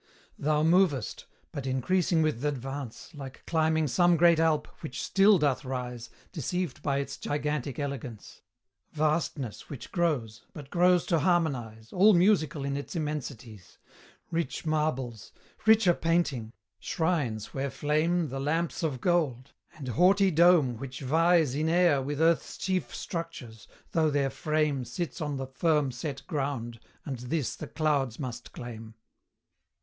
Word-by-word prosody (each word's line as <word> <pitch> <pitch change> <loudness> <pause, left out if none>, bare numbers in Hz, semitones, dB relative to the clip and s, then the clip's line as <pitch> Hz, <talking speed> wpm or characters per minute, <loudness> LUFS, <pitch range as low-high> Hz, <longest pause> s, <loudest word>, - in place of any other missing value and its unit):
Thou 150 +1 +1
movest 165 - +2 0.2
but 135 -2 -5
increasing 160 +6 +1
with 155 -7 -1
th' - - -3
advance, 135 0 -5
Like 135 -3 -10
climbing 160 -1 +1
some 175 +5 +3
great 170 0 +5
Alp, 160 -2 +2
which 140 -6 -6
still 195 +1 +5
doth 145 -3 +1
rise, 125 -3 -5 0.2
Deceived 180 +2 -3
by 140 -2 0
its 140 - -3
gigantic 145 -2 -2
elegance; 135 -6 -6 0.5
Vastness 150 -6 -1
which 140 -5 -8
grows 130 - -1
but 145 -3 -10
grows 180 0 +4
to 165 - +2
harmonise 130 - -1
All 200 +2 +6
musical 170 -6 +2
in 140 0 -2
its 140 - -6
immensities; 130 - -5 0.5
Rich 165 -1 -2
marbles 135 -8 -2 0.3
richer 220 -5 +6
painting 165 -10 0 0.3
shrines 145 - -1
where 135 +1 -2
flame 155 +4 0
The 135 +2 -4
lamps 160 +4 -1
of 145 -7 -2
gold 140 -7 0 0.2
and 140 -5 -7
haughty 190 - +4
dome 160 -7 +5
which 130 +2 -7
vies 160 +1 +3
In 155 +3 0
air 170 -5 +4
with 145 +2 -4
Earth's 165 0 +2
chief 185 -1 -2
structures, 165 - -6 0.2
though 160 -2 +2
their 140 -2 +1
frame 150 -3 0
Sits 165 +9 -5
on 145 -2 -2
the 135 - -3
firm 150 +1 +1
set 135 +2 -6
ground 135 -7 -3 0.3
and 135 -4 -4
this 130 0 -2
the - - -7
clouds 145 -7 0
must 125 -3 -6
claim. 115 -2 -9
150 Hz, 140 wpm, -28 LUFS, 130-165 Hz, 0.5 s, All